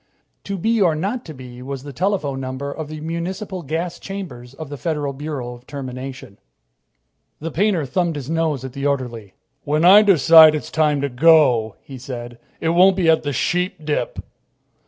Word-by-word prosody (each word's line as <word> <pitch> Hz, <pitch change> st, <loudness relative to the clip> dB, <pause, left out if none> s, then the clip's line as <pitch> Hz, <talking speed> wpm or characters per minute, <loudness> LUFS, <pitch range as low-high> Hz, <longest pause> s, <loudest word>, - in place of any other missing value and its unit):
"To 200 Hz, 0 st, -3 dB
be 225 Hz, +4 st, +1 dB
or 170 Hz, -5 st, +3 dB
not 205 Hz, +10 st, -3 dB
to 155 Hz, -, -8 dB
be" 125 Hz, -1 st, -11 dB
was 135 Hz, 0 st, -6 dB
the 145 Hz, -1 st, -9 dB
telephone 170 Hz, -5 st, -1 dB
number 130 Hz, +2 st, -5 dB
of 155 Hz, +1 st, -6 dB
the 155 Hz, 0 st, -7 dB
municipal 180 Hz, +4 st, -4 dB
gas 165 Hz, +3 st, -4 dB
chambers 135 Hz, -11 st, -8 dB
of 155 Hz, 0 st, -8 dB
the 145 Hz, -, -6 dB
Federal 145 Hz, 0 st, -3 dB
Bureau 135 Hz, -3 st, -5 dB
of 120 Hz, +1 st, -15 dB
Termination. 130 Hz, -5 st, -8 dB, 1.0 s
The 165 Hz, +2 st, -5 dB
painter 180 Hz, -2 st, +1 dB
thumbed 170 Hz, +3 st, -1 dB
his 140 Hz, -3 st, -6 dB
nose 160 Hz, -4 st, -1 dB
at 130 Hz, -, -8 dB
the 140 Hz, +1 st, -2 dB
orderly. 120 Hz, -8 st, -3 dB, 0.3 s
"When 150 Hz, +3 st, +1 dB
I 195 Hz, +4 st, +9 dB
decide 165 Hz, -5 st, +7 dB
it's 150 Hz, -, -5 dB
time 150 Hz, -3 st, +1 dB
to 140 Hz, -, -1 dB
go," 125 Hz, -6 st, +4 dB
he 135 Hz, -2 st, -10 dB
said, 120 Hz, -2 st, -8 dB, 0.2 s
"it 165 Hz, -, -1 dB
won't 180 Hz, +3 st, +5 dB
be 175 Hz, -4 st, +3 dB
at 160 Hz, -, +2 dB
the 145 Hz, -, -3 dB
Sheepdip." 160 Hz, +1 st, -2 dB
150 Hz, 180 wpm, -20 LUFS, 130-170 Hz, 1.0 s, I